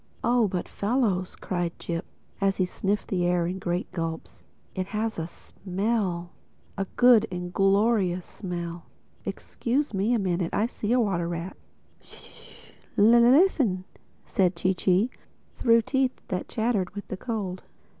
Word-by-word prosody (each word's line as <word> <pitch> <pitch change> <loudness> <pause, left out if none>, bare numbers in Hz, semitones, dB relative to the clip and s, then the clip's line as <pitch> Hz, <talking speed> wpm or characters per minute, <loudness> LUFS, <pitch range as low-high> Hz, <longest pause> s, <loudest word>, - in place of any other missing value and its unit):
"Oh, 240 -2 +3
but 180 -2 -3
fellows," 205 -5 0
cried 175 -2 -3
Jip, 170 +1 -4 0.4
as 195 0 +2
he 185 - +2
sniffed 200 +3 -1
up - - -27
the 180 -2 0
air 175 -1 +2
in 185 +2 -3
great 175 -1 -2
gulps, 165 -3 -5 0.3
"it 185 0 -3
has 215 -1 -2
a 160 - -3
smell—a 190 0 -4
good 245 -3 +6
and 180 0 -5
glorious 195 -2 +2
smell!—Excuse 180 - -4
me 205 +5 +2
a - - +3
minute: 180 -4 -1
I 210 - +2
see 225 -2 -3
a 250 - +4
water 190 -7 +1
rat." 170 +2 -4 0.4
"Sh!—Listen!" 235 - +2 0.4
said 185 -2 +1
Chee 185 +3 +1
Chee 190 +6 +2 0.5
through 230 -1 +5
teeth 265 0 0
that 180 -1 -3
chattered 220 -4 0
with 205 - -6
the 190 - -4
cold. 195 -5 -4
195 Hz, 135 wpm, -26 LUFS, 180-225 Hz, 0.5 s, good